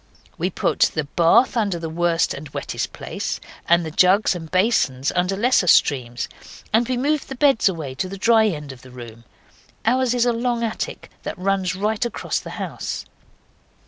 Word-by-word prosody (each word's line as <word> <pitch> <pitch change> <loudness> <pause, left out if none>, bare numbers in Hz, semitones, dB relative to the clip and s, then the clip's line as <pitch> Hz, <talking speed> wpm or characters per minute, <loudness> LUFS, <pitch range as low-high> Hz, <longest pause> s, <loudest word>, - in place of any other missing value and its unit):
We - - -1
put - - +1
the 155 - 0
bath 170 - +3
under 205 -6 0
the 165 -1 -5
worst 170 +1 +1
and 145 +1 -8
wettest - - -4
place, - - -5 0.3
and 170 0 +4
the 160 - -5
jugs 190 +6 +4
and 165 -3 -7
basins 185 - +1
under 180 +2 +1
lesser 235 -4 +3
streams, 125 -7 +2 0.5
and 230 +3 +3
we 255 - 0
moved 290 +3 0
the 265 - -5
beds 270 -6 +4
away 155 -7 -5
to 185 +8 -3
the 195 - -7
dry 220 +2 +4
end 150 -7 -4
of 130 -2 -12
the 130 - -14
room. 120 -2 -11 0.6
Ours 250 +1 +2
is 245 -1 +2
a 240 - +2
long 235 0 -1
attic 225 -1 -4
that - - -6
runs 185 -1 0
right 210 +4 -1
across 240 - -2
the - - -9
house. - - -5
185 Hz, 180 wpm, -22 LUFS, 160-230 Hz, 0.6 s, and